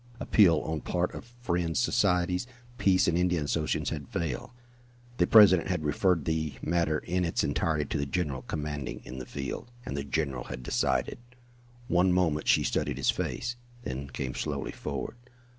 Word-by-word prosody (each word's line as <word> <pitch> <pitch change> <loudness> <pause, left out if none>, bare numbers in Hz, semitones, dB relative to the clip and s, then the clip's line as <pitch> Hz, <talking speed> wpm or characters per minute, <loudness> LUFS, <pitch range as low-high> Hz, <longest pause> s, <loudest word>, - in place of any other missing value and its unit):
Appeal 85 -8 +5
on 80 -1 -3
part 90 0 -1
of 120 +1 -10
Friends 85 -6 0
Societies, 95 -4 +2 0.3
Peace 95 -1 +4
and 85 - +2
Indian 90 -3 +1
Associations 75 +1 -1
had 75 -3 -5
failed. 80 -8 -3 0.7
The 90 - +3
President 100 -6 +7
had 90 -4 -1
referred 85 +1 +2
the 80 -2 -1
matter 85 -2 +1
in 90 +3 -1
its 85 - 0
entirety 75 +1 0
to - - -2
the 70 - -1
general 70 -4 -2
commanding 75 -3 -4
in 65 - -7
the - - -7
field, 70 - -5 0.2
and 70 - -4
the 70 - -2
general 70 -3 -2
had 65 -1 -7
decided. - - 0 0.7
One 90 +1 +3
moment 80 -4 +1
she - - +5
studied - - -1
his - - +3
face, 120 0 -3 0.3
then 70 - -4
came 65 -1 -4
slowly - - -3
forward. - - -5
80 Hz, 165 wpm, -29 LUFS, 75-90 Hz, 0.7 s, President